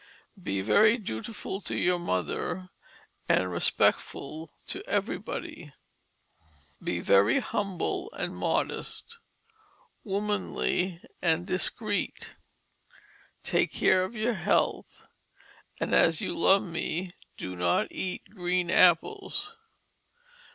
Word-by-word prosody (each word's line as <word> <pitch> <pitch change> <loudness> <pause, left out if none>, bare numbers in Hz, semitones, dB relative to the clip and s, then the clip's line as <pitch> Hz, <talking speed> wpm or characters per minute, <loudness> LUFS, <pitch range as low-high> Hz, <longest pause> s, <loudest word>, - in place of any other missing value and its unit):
Be 100 - -1
very 210 - +5
dutiful 195 - -5
to - - -3
your 180 0 +2
Mother, 175 - -2 0.6
and 90 0 +3
respectful 150 - 0 0.2
to - - -5
everybody. - - -3 1.1
Be - - -1
very 100 +4 +5
humble 195 -4 -2
and - - -4
modest, 465 0 -2 0.8
womanly 195 -3 -1 0.2
and 170 0 +2
discreet. 205 +3 -2 1.1
Take - - +1
care 185 0 +3
of 190 +6 -5
your 230 +2 +1
health 190 - 0 0.7
and - - -1
as 165 -1 +5
you - - -3
love 195 +4 +4
me 175 0 -3 0.2
do 95 0 -5
not 90 0 +1
eat 185 -1 -4
green 180 -3 0
apples. 395 - +3
180 Hz, 95 wpm, -28 LUFS, 160-205 Hz, 1.1 s, very